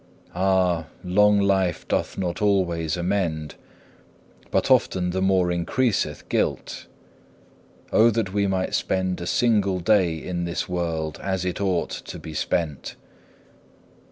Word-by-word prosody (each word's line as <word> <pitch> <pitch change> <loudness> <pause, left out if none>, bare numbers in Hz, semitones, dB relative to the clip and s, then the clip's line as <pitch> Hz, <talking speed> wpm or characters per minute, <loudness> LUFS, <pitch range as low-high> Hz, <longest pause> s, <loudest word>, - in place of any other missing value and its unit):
Ah! 90 -2 +1 0.2
long 105 +3 +4
life 95 -3 +1
doth - - -1
not 90 0 -3
always 85 -6 +1
amend, 85 -4 -1 1.0
but - - +1
often 90 -1 +2
the 95 +1 -2
more 95 -2 +2
increaseth 100 +7 -1
guilt. - - -2 1.0
Oh 115 +2 +6
that 110 -4 -1
we 100 -1 +1
might 95 -1 -1
spend 95 -1 -1
a 85 - -4
single 100 -6 +2
day 90 -2 +3
in 85 +1 -4
this 85 0 -3
world 80 -3 -3
as 95 -2 -2
it 90 +2 -3
ought 95 -4 0
to - - -7
be 80 - -9
spent! 75 -1 -2
90 Hz, 130 wpm, -24 LUFS, 85-100 Hz, 1.0 s, Oh